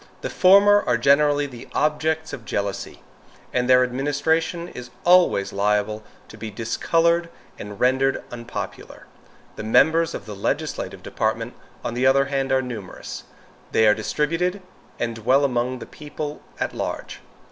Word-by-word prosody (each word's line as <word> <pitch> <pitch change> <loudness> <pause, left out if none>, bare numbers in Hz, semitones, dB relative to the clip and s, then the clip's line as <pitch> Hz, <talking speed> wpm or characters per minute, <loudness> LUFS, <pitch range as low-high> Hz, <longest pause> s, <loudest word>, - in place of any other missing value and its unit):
The - - -4
former 200 +2 +6
are 120 - +3
generally 145 +3 +3
the 125 -4 -10
objects 160 +1 0
of 120 - -7
jealousy, 100 -2 -4 0.5
and 125 0 0
their 125 0 +7
administration 145 +6 0
is 125 -7 -9 0.2
always 175 - +4
liable 105 +1 0 0.3
to 110 - -12
be 110 - -5
discolored 165 +10 +1 0.3
and 105 -1 -8
rendered 130 +2 +2
unpopular. 120 0 -7 0.5
The - - -5
members 160 +9 +3
of - - -7
the 105 -2 -7
legislative 100 - -3
department, - - -2 0.3
on - - -2
the 125 +2 +2
other 135 +1 +4
hand, 135 -1 -1
are 130 0 +2
numerous. 115 -7 -7 0.5
They 110 - +4
are 105 - +6
distributed 165 - -1 0.3
and 115 -1 -3
dwell 130 +6 +3
among 125 -1 -1
the - - -8
people 150 0 -7 0.2
at - - -2
large. - - -5
130 Hz, 145 wpm, -23 LUFS, 115-160 Hz, 0.5 s, their